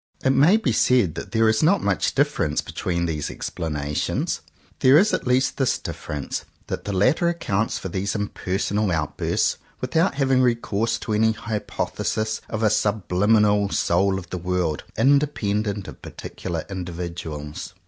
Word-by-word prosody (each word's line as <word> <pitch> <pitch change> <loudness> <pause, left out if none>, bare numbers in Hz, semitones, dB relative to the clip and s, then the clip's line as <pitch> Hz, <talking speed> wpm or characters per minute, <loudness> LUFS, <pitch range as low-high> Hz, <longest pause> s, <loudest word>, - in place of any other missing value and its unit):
It 130 - +5
may 155 +10 +5
be 180 - 0
said 115 -6 +3
that - - -7
there 115 -1 +3
is 110 0 +3
not 185 +6 +3
much - - 0
difference 135 - +1
between 85 -1 -2
these 80 -3 -2
explanations. 75 -2 -2 0.4
There 130 +3 +6
is 205 +6 +4
at - - -1
least 130 +1 +2
this 135 -2 +2
difference, 75 -2 -5 0.2
that - - -5
the 105 - -2
latter 130 - +3
accounts 115 -11 -1
for - - -5
these 95 +3 -2
impersonal 105 0 -1
out 75 -4 -1
bursts - - 0 0.2
without 160 +5 +1
having 135 -2 +3
recourse 115 -3 +1
to 110 - -3
any 110 +1 +3
hypothesis 110 0 -3
of 110 0 -2
a 105 - +4
subliminal 105 0 +2
*'soul 95 +2 +2
of_ 90 -2 -12
the 90 - -3
world," 90 -4 -1
independent 110 -7 +1
of - - -10
particular 85 -3 -6
indi 95 -2 -5
viduals. 80 -3 -6
105 Hz, 155 wpm, -23 LUFS, 90-125 Hz, 0.4 s, There